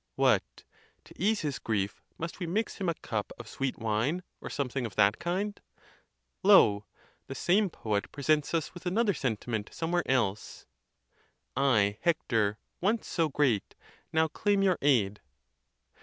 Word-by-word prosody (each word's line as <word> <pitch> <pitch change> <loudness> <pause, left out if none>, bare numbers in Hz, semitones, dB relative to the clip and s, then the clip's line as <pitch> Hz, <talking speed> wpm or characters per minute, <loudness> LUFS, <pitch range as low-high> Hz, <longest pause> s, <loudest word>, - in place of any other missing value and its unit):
What! - - +1 0.4
to - - -16
ease 210 +4 +1
his 145 -5 -3
grief, 100 -4 -2 0.2
must 165 +3 -5
we 175 - -3
mix 210 +6 -1
him 190 -3 -1
a 165 - -1
cup 110 -8 -4
of 120 - -9
sweet 135 +2 -3
wine, 115 +11 0 0.2
or - - -6
something 135 -2 -2
of 100 - -13
that 105 +1 +4
kind? 200 +4 -2 0.8
Lo! 110 - +6 0.4
the 135 - -6
same 195 +7 +2
poet 105 -9 -2
pre 140 - -8
sents 155 +2 +2
us 160 - -2
with 175 0 -8
another 205 +3 +2
sentiment 115 - -2
somewhere 175 +2 0
else: 110 -6 -1 0.9
I, 110 -7 +2
Hector, 115 -11 +1 0.2
once 215 +5 0
so 165 -3 0
great, 130 -8 +1 0.4
now 160 0 +3
claim 200 +5 +1
your 185 -3 +2
aid. 110 -8 +2
140 Hz, 150 wpm, -29 LUFS, 110-175 Hz, 0.9 s, Lo